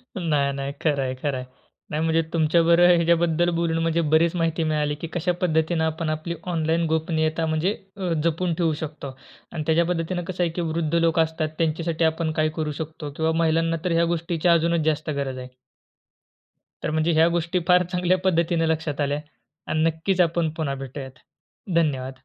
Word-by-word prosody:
नाही, 150 -6 0
नाही, 140 0 -4
खरं 145 -3 +1
आहे, 130 0 -2
खरं 135 0 -2
आहे. 130 - -6 0.5
नाही, 155 +1 -1
म्हणजे 165 0 +2
तुमच्या 165 +1 +3
बरोबर 175 +1 +6
ह्याच्याबद्दल 170 0 +2
बोलून 165 -1 0
म्हणजे 165 0 +1
बरीच 165 +2 +4
माहिती 165 -1 0
मिळाली 150 -2 0
की 165 - -2
कशा 180 +1 0
पद्धतीनं 160 -1 +1
आपण 160 0 -2
आपली 155 +2 -3 0.2
ऑनलाईन 165 +1 +1
गोपनीयता 160 0 0
म्हणजे 160 +6 0 0.2
अ, 185 -3 -2
जपून 170 +1 0
ठेवू 165 -2 +1
शकतो. 145 -3 -7 0.4
आणि 155 - -4
त्याच्या 165 +1 +3
पद्धतीने 175 +1 -2
कसं 180 -1 -1
आहे 170 - +1
की - - +1
वृद्ध 165 -1 -2
लोकं 165 -1 +3
असतात 160 -1 -3
त्यांच्यासाठी, 165 0 0
आपण 160 0 0
काय 155 - +2
करू 150 -1 -1
शकतो 155 -1 -6
किंवा 160 0 +1
महिलांना 165 +1 +1
तर 180 - +1
ह्या 165 0 +3
गोष्टीची 170 +1 -2
अजूनच 170 -1 +3
जास्त 155 0 0
गरज 135 -2 -3
आहे? 125 0 -7 1.4
तर - - -1
म्हणजे 160 +2 +1
ह्या 160 +1 +5
गोष्टी 170 +1 0
फार 180 0 +6
चांगल्या 180 +1 +2
पद्धतीने 170 -2 +2
लक्षात 155 -2 -1
आल्या 145 +1 0 0.5
आणि 155 0 +1
नक्कीच 165 +4 0
आपण 170 -1 +2
पुन्हा 140 -3 -1
भेटूयात. 130 0 -8 0.6
धन्यवाद. 130 -5 -1
160 Hz, 180 wpm, -24 LUFS, 155-170 Hz, 1.4 s, बरोबर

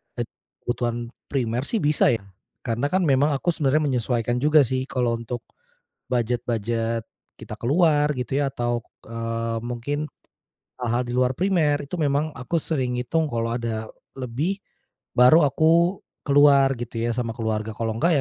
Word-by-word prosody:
ed - - -3 0.4
kebutuhan 120 -1 -2 0.2
primer 125 -2 -1
sih 225 - -1
bisa 145 -4 +3
ya. 110 - -6 0.4
Karena 120 +3 -1
kan 185 +4 +1
memang 145 -1 +3
aku 175 +6 0
sebenarnya 155 -1 +1
menyesuaikan 120 -1 0
juga 150 +2 +5
sih, 130 +1 -1
kalau 120 -3 0
untuk 115 0 -5 0.7
budget-budget 115 -1 -1 0.3
kita - - -9
keluar 150 +2 +3
gitu 125 +3 -1
ya. 140 - +1
Atau, 120 -2 -2 0.2
eee, 115 0 -3
mungkin 125 +6 -3 0.7
hal-hal 120 +1 +1
di 120 - -4
luar 125 0 +3
primer 170 -6 +2
itu - - -7
memang 150 0 0
aku 130 +7 -2
sering 130 -6 -1
hitung 150 +5 0
kalau 115 0 -1
ada 115 -2 -3 0.3
lebih, 140 +11 -2 0.6
baru 125 +7 +7
aku 165 +6 +3 0.3
keluar 140 -2 +5
gitu 115 -1 -5
ya 115 - 0
sama 120 -2 -1
keluarga, 110 -1 -2
kalau 110 0 -3
nggak 170 +9 +2
125 Hz, 150 wpm, -24 LUFS, 115-145 Hz, 0.7 s, baru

